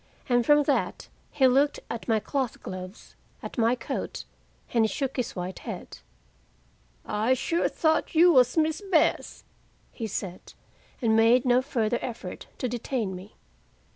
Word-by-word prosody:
And 245 Hz, -2 st, +3 dB
from 295 Hz, +4 st, +5 dB
that 285 Hz, 0 st, -1 dB, 0.2 s
he 275 Hz, -3 st, +2 dB
looked 275 Hz, +3 st, +3 dB
at 230 Hz, -, -6 dB
my 225 Hz, -2 st, +3 dB
cloth 260 Hz, +1 st, -3 dB
gloves, 185 Hz, +2 st, -8 dB, 0.3 s
at -, -, -6 dB
my 230 Hz, +2 st, +3 dB
coat, -, -, -5 dB, 0.5 s
and 230 Hz, -2 st, +4 dB
he -, -, +3 dB
shook 270 Hz, +4 st, -3 dB
his 250 Hz, -3 st, -3 dB
white 180 Hz, 0 st, -5 dB
head. -, -, -8 dB, 1.1 s
"I 220 Hz, +5 st, +1 dB
sure 335 Hz, +6 st, 0 dB
thought 315 Hz, 0 st, 0 dB
you 345 Hz, +2 st, +7 dB
was 250 Hz, +1 st, +4 dB
Miss 315 Hz, +2 st, +1 dB
Bess," 320 Hz, -4 st, +1 dB, 0.5 s
he 225 Hz, -, -5 dB
said, 185 Hz, -3 st, -6 dB, 0.5 s
and 220 Hz, -1 st, +3 dB
made 230 Hz, +3 st, +5 dB
no 250 Hz, 0 st, +4 dB
further 240 Hz, -4 st, -1 dB
effort 235 Hz, -2 st, -7 dB
to 255 Hz, -, -2 dB
detain 235 Hz, -4 st, -3 dB
me. 190 Hz, +4 st, -11 dB
245 Hz, 150 wpm, -27 LUFS, 220-275 Hz, 1.1 s, you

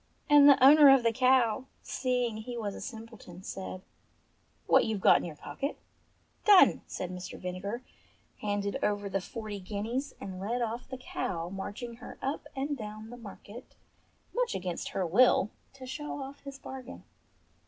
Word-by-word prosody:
And 290 Hz, -1 st, +8 dB
the 275 Hz, -2 st, +6 dB
owner 290 Hz, +1 st, +9 dB
of 270 Hz, -2 st, +6 dB
the 230 Hz, -, +3 dB
cow, 255 Hz, -1 st, +3 dB, 0.2 s
seeing 250 Hz, -3 st, -1 dB
he 240 Hz, +2 st, -6 dB
was 210 Hz, -3 st, -3 dB
a -, -, -8 dB
simpleton, 225 Hz, -6 st, -9 dB
said, 190 Hz, -1 st, -6 dB, 0.8 s
"What -, -, +5 dB
youVe 220 Hz, -2 st, -1 dB
got -, -, +6 dB
in -, -, -4 dB
your 165 Hz, -3 st, -7 dB
pocket." 275 Hz, -, -5 dB, 0.7 s
"Done 405 Hz, -3 st, +7 dB
!" -, -, -39 dB
said 180 Hz, -1 st, -5 dB
Mr. 180 Hz, 0 st, -7 dB
Vinegar, 190 Hz, +6 st, -5 dB, 0.6 s
handed 205 Hz, -1 st, -2 dB
over 205 Hz, -1 st, 0 dB
the 195 Hz, 0 st, -1 dB
forty 215 Hz, 0 st, -6 dB
guineas 220 Hz, +8 st, -4 dB
and 185 Hz, -2 st, -7 dB
led 225 Hz, +6 st, -2 dB
off 235 Hz, +2 st, -4 dB
the 260 Hz, -, -5 dB
cow, 175 Hz, -8 st, -4 dB
marching 205 Hz, +5 st, -6 dB
her 245 Hz, -, -10 dB
up 275 Hz, +3 st, -3 dB
and 280 Hz, +2 st, -2 dB
down 215 Hz, -1 st, -8 dB
the -, -, -7 dB
market, 220 Hz, +1 st, -11 dB, 0.6 s
much -, -, 0 dB
against 180 Hz, -2 st, -3 dB
her 190 Hz, -, -1 dB
will, 215 Hz, +3 st, +4 dB, 0.2 s
to 265 Hz, -1 st, -11 dB
show 295 Hz, +3 st, -5 dB
off 275 Hz, +1 st, -7 dB
his 275 Hz, -1 st, -7 dB
bargain. 260 Hz, -, -9 dB
225 Hz, 165 wpm, -30 LUFS, 200-260 Hz, 0.8 s, owner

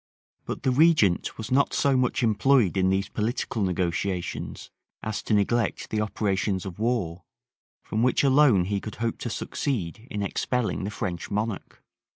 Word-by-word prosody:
But -, -, -5 dB
the 130 Hz, -, +2 dB
regent 145 Hz, -, +3 dB
was 110 Hz, +3 st, -6 dB
not 140 Hz, +2 st, +3 dB
so 140 Hz, -1 st, +3 dB
much 125 Hz, -1 st, +1 dB
employed 115 Hz, -1 st, +3 dB
in 95 Hz, -1 st, +2 dB
these 95 Hz, +1 st, +1 dB
political 115 Hz, +1 st, -2 dB
negotiations 90 Hz, 0 st, -2 dB, 0.3 s
as 110 Hz, -1 st, -3 dB
to 110 Hz, -, +1 dB
neglect 115 Hz, +3 st, 0 dB
the 110 Hz, -, 0 dB
operations 100 Hz, -2 st, -1 dB
of 95 Hz, 0 st, -7 dB
war, 105 Hz, -7 st, -1 dB, 0.6 s
from 110 Hz, -, -2 dB
which 125 Hz, +3 st, +3 dB
alone 135 Hz, -9 st, +5 dB
he 100 Hz, +1 st, -1 dB
could 110 Hz, -, -7 dB
hope 115 Hz, 0 st, -2 dB
to 120 Hz, -, -4 dB
succeed 110 Hz, -, -3 dB
in 105 Hz, -1 st, -3 dB
expelling 115 Hz, 0 st, -1 dB
the -, -, -2 dB
French 90 Hz, -5 st, -4 dB
monarch. 105 Hz, 0 st, -4 dB
105 Hz, 160 wpm, -26 LUFS, 95-125 Hz, 0.6 s, alone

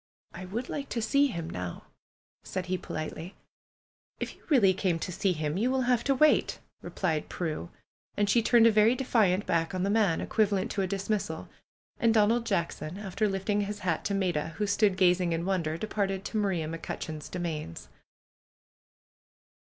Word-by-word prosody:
"I 185 Hz, -, -7 dB
would 225 Hz, +7 st, -4 dB
like 280 Hz, -1 st, -5 dB
to 235 Hz, -, -2 dB
see 280 Hz, +6 st, +3 dB
him 170 Hz, -10 st, -5 dB
now," 90 Hz, -, -6 dB, 0.6 s
said 185 Hz, -1 st, -4 dB
he 185 Hz, 0 st, -1 dB
politely. 160 Hz, +4 st, -6 dB, 0.8 s
"If -, -, -4 dB
you -, -, -25 dB
really 220 Hz, -, +5 dB
came 180 Hz, -2 st, 0 dB
to 175 Hz, -, -4 dB
see 190 Hz, +2 st, +1 dB
him 155 Hz, -1 st, -2 dB
you 240 Hz, +4 st, +2 dB
will 260 Hz, 0 st, +1 dB
have 245 Hz, -1 st, +2 dB
to 275 Hz, -, +3 dB
wait," 305 Hz, +3 st, +3 dB, 0.2 s
replied 160 Hz, -5 st, -2 dB
Prue. 155 Hz, -, -4 dB, 0.5 s
And 205 Hz, -, +2 dB
she 235 Hz, +3 st, +4 dB
turned 230 Hz, 0 st, +5 dB
a 230 Hz, -, +7 dB
very 215 Hz, +3 st, +4 dB
defiant 215 Hz, -7 st, +2 dB
back 165 Hz, +2 st, 0 dB
on 185 Hz, -, -1 dB
the 200 Hz, -, +1 dB
man, 205 Hz, -6 st, +2 dB
equivalent 205 Hz, -3 st, 0 dB
to 200 Hz, -, -1 dB
a 190 Hz, -, 0 dB
dismissal. 200 Hz, +2 st, -3 dB, 0.5 s
And 230 Hz, -1 st, +3 dB
Donald 225 Hz, +2 st, +3 dB
Jackson, 170 Hz, -3 st, -2 dB
after 205 Hz, +1 st, -1 dB
lifting 200 Hz, +2 st, 0 dB
his 205 Hz, +1 st, -4 dB
hat 175 Hz, -4 st, -1 dB
to 200 Hz, -, 0 dB
Maida, 175 Hz, -5 st, -1 dB
who 210 Hz, -, 0 dB
stood 200 Hz, -1 st, +2 dB
gazing 180 Hz, -2 st, +3 dB
in 165 Hz, +1 st, -2 dB
wonder, 170 Hz, -5 st, -1 dB
departed 195 Hz, -1 st, -2 dB
to 220 Hz, -, -3 dB
Maria 190 Hz, -7 st, 0 dB
McCutcheon's 160 Hz, -1 st, -6 dB
domains. 160 Hz, -, -5 dB
195 Hz, 175 wpm, -29 LUFS, 170-215 Hz, 0.8 s, a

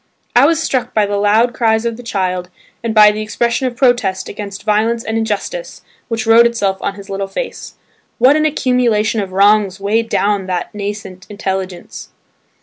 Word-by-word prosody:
I 255 Hz, +4 st, +6 dB
was 325 Hz, -1 st, +2 dB
struck 265 Hz, -5 st, -2 dB
by 215 Hz, -1 st, +3 dB
the 205 Hz, 0 st, -2 dB
loud 215 Hz, +4 st, +2 dB
cries 220 Hz, -2 st, +1 dB
of 230 Hz, -1 st, -1 dB
the 245 Hz, -, -10 dB
child 185 Hz, -5 st, -2 dB, 0.3 s
and 230 Hz, -, -1 dB
by 210 Hz, -1 st, +8 dB
the 210 Hz, +1 st, -4 dB
expression 235 Hz, +4 st, -1 dB
of 245 Hz, -, -5 dB
protest 240 Hz, -7 st, +1 dB
against 200 Hz, -1 st, -7 dB
violence 225 Hz, +2 st, +1 dB
and 220 Hz, -, -3 dB
injustice 225 Hz, -, -3 dB, 0.2 s
which 225 Hz, -1 st, -3 dB
wrote 230 Hz, +1 st, +6 dB
itself 200 Hz, -5 st, -1 dB
on 195 Hz, -, -3 dB
his 200 Hz, -1 st, -11 dB
little 195 Hz, 0 st, -3 dB
face. -, -, -6 dB, 0.4 s
What 260 Hz, +4 st, +5 dB
an 310 Hz, 0 st, +2 dB
accumulation 240 Hz, -6 st, +1 dB
of 195 Hz, -2 st, -6 dB
wrongs 200 Hz, 0 st, +3 dB
weighed 220 Hz, +3 st, 0 dB
down 200 Hz, -2 st, 0 dB
that 180 Hz, +2 st, -3 dB
nascent 200 Hz, -3 st, -6 dB
intelligence 190 Hz, -3 st, -5 dB
215 Hz, 175 wpm, -16 LUFS, 200-235 Hz, 0.4 s, by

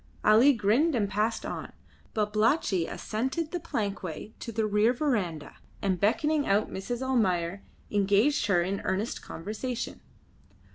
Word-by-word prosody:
Ali 225 Hz, +7 st, +7 dB
grinned 250 Hz, +7 st, +2 dB
and 210 Hz, -4 st, +1 dB
passed 210 Hz, +3 st, -1 dB
on; -, -, -5 dB, 0.4 s
Babalatchi 215 Hz, -, +2 dB
ascended 265 Hz, +9 st, -3 dB
the 355 Hz, -, -2 dB
plankway 205 Hz, -, -4 dB
to 230 Hz, -, -6 dB
the 220 Hz, 0 st, 0 dB
rear 210 Hz, +3 st, +3 dB
verandah, 195 Hz, -, -2 dB, 0.2 s
and 190 Hz, -3 st, 0 dB
beckoning 295 Hz, +8 st, +2 dB
out 205 Hz, +2 st, +2 dB
Mrs. 240 Hz, +6 st, -4 dB
Almayer, 195 Hz, -8 st, +1 dB, 0.3 s
engaged 205 Hz, +8 st, +3 dB
her 175 Hz, -4 st, +3 dB
in 195 Hz, +3 st, -2 dB
earnest 195 Hz, +5 st, -2 dB
conversation. 220 Hz, +7 st, -5 dB
215 Hz, 130 wpm, -28 LUFS, 195-250 Hz, 0.4 s, Ali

